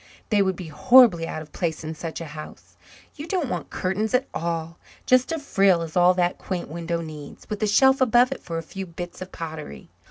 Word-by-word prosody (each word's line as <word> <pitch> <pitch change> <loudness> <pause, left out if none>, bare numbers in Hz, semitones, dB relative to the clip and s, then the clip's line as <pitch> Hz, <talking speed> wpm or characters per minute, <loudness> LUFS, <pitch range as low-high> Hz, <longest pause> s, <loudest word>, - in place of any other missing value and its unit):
They 210 -2 +3
would 190 -1 +1
be 170 -2 -8
horribly 190 - +5
out 155 - -5
of 150 - -18
place 165 -3 -2
in 160 +1 -4
such 160 0 -6
a - - -5
house. 155 -1 -11 0.4
You 300 +2 -8
don't 345 -8 -1
want - - -4
curtains 205 +5 -1
at 265 +2 +1
all 165 0 -3 0.3
just 255 +4 +3
a 325 - -1
frill 195 - +2
is 160 -1 -8
all 180 0 +5
that 180 -1 0
quaint 180 -5 -4
window 170 +1 -3
needs, 155 -3 -10
with 210 - -3
a 215 - +2
shelf 265 +6 +4
above 245 +1 +4
it 270 - -5
for 165 -1 -5
a 165 - -4
few 190 +3 -7
bits 175 +1 -8
of 185 - -7
pottery. 155 - -8
180 Hz, 220 wpm, -24 LUFS, 165-220 Hz, 0.4 s, horribly